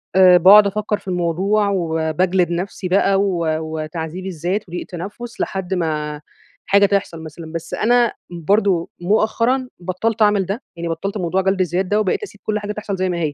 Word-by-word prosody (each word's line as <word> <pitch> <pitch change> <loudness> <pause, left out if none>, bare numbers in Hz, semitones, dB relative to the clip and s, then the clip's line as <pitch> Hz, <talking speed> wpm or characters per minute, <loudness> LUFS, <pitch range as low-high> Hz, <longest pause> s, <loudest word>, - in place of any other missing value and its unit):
آآ، 185 -1 +7
باقعد 200 +4 +8
أفكر 210 +1 -1
في 200 - -22
الموضوع، 185 +4 +1
وباجلد 175 0 0
نفسي 185 +2 -3
بقى 195 +1 +3
و 180 -4 0
وتعذيب 160 +2 -5
الذات 185 +3 -2
وضيق 175 +1 -5
تنفُّس 205 +7 -7
لحد 190 -1 -3
ما 150 -4 -2 0.4
حاجة 200 0 +4
تحصل 195 -5 -1
مثلًا، 160 +1 -9
بس 165 -1 -6
أنا 240 +1 +2 0.2
برضه 175 +1 +1
مؤخرًا 230 +7 +1
بطلت 185 +6 -2
أعمل 205 -2 +4
ده 200 +7 -4
يعني 170 0 -5
بطلت 195 +6 -3
موضوع 185 0 0
جلد 190 0 0
الذات 180 +1 0
ده 205 +3 +1
وبقيت 210 - 0
أسيب 420 - -10
كل 210 -1 -1
حاجة 205 0 -5
تحصل 210 -1 -4
زي 185 0 -1
ما 175 - -2
هي. 155 -3 -1
185 Hz, 175 wpm, -19 LUFS, 170-205 Hz, 0.4 s, باقعد